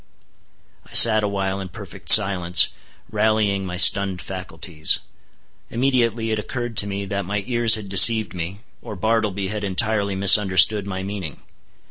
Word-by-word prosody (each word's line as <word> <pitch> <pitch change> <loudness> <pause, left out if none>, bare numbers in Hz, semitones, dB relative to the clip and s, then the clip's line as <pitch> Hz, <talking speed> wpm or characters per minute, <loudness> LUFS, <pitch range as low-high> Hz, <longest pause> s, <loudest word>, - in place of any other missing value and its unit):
I - - -13
sat 110 -2 +7
awhile 100 -1 -4
in 95 -1 -9
perfect 100 -1 -13
silence, 90 -4 +5 0.4
rallying 105 -3 -2
my 90 0 -7
stunned 95 0 +3
faculties. 85 -4 -3 0.7
Immediately 115 -3 -2
it 110 - -3
occurred 120 +1 -7
to 100 - +1
me 100 0 -6
that 100 0 -5
my 100 +2 -5
ears 120 -2 +2
had 110 -2 -9
deceived 100 0 +4
me, 90 +3 -8 0.2
or 105 - -10
Bartleby 105 -2 -3
had 105 0 -7
entirely 100 0 -2
misunderstood 100 +1 +3
my 95 -1 -7
meaning. 95 -6 -9
100 Hz, 140 wpm, -19 LUFS, 95-110 Hz, 0.7 s, sat